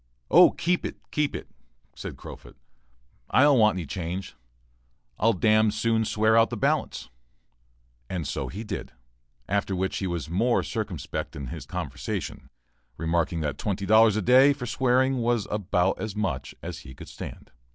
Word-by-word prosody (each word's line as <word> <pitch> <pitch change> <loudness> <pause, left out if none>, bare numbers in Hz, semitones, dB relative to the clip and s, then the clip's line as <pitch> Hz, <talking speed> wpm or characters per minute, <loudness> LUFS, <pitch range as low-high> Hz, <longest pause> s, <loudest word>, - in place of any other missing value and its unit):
"Oh, - - +8
keep 175 +1 -1
it, - - -4 0.2
keep 150 -1 0
it," - - -6 0.5
said - - -7
Crofut, - - -11 0.7
"I 130 - +5
don't 145 -3 +5
want 105 -2 +5
any 90 -3 -4
change, 90 +4 -5 0.9
I'll 115 +3 +4
d 95 - 0
d 110 0 +5
soon 110 +1 +1
swear 110 +1 +2
out 115 0 +5
the 120 - -4
balance." - - -1 1.0
He 90 +4 -4
did 105 - -5
so, - - -31 0.5
after 100 -1 0
which 95 +1 -1
he 95 - -2
was 85 -4 -3
more 110 +9 +1
circumspect 105 - -4
in 70 -3 -6
his - - -7
conversation, 70 +1 -5 0.5
remarking 85 0 0
that 75 -2 -3
twenty 100 -3 -2
dollars 110 0 +6
a 110 - 0
day 130 +6 +6
for 130 -3 -6
swearing 130 +2 +2
was 120 -3 0
about 95 -2 0
as 110 -2 -4
much 90 -12 -3
as - - -6
he 65 - -12
could - - -11
stand. - - -9
105 Hz, 160 wpm, -26 LUFS, 90-115 Hz, 1.0 s, Oh